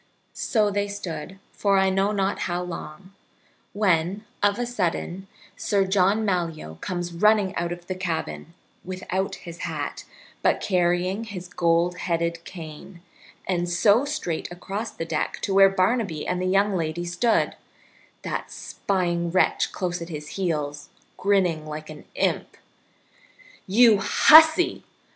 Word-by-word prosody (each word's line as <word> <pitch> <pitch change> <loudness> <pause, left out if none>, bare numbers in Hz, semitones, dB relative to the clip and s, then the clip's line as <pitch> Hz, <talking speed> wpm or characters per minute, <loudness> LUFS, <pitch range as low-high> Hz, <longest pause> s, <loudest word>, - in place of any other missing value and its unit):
So 210 -3 +1
they 205 0 0
stood 190 -3 -6
for 200 -1 +1
I 190 0 +3
know 195 +2 +1
not 195 -1 0
how 175 +1 -1
long 180 +1 -8 0.6
when, 195 0 +1 0.2
of 205 0 +3
a 245 - -1
sudden, 190 -4 -2 0.3
Sir 200 -2 +1
John 195 +3 +2
Malyoe 165 - -2
comes 175 -1 -4
running 205 +1 +3
out 170 0 -2
of 175 0 -7
the 185 - -3
cabin, 170 -2 -4 0.3
without 185 +1 -3
his 170 -1 -10
hat, - - -4 0.4
but - - +2
carrying 180 +3 0
his 185 -4 -7
gold 170 0 +1
headed 170 -1 -1
cane, 170 +1 -10 0.4
and 175 -2 0
so 205 +7 +4
straight 280 - -3
across 195 +5 -5
the 165 - -6
deck 160 -2 -2
to 195 - 0
where 195 0 +7
Barnaby 195 -3 0
and 180 - -1
the 185 - 0
young 195 +1 +2
lady 165 0 -2
stood, 180 +7 +1 0.7
that - - -4
spying 175 -3 -2
wretch 185 +2 +2
close 175 -2 -3
at 170 - -6
his 150 -2 -7
heels, 150 -6 -3 0.3
grinning 185 -6 +1
like 155 +1 -7
an 150 - -11
imp. - - -1 1.1
"You 220 +1 +6
hussy!" 315 - +6
185 Hz, 140 wpm, -24 LUFS, 170-200 Hz, 1.1 s, where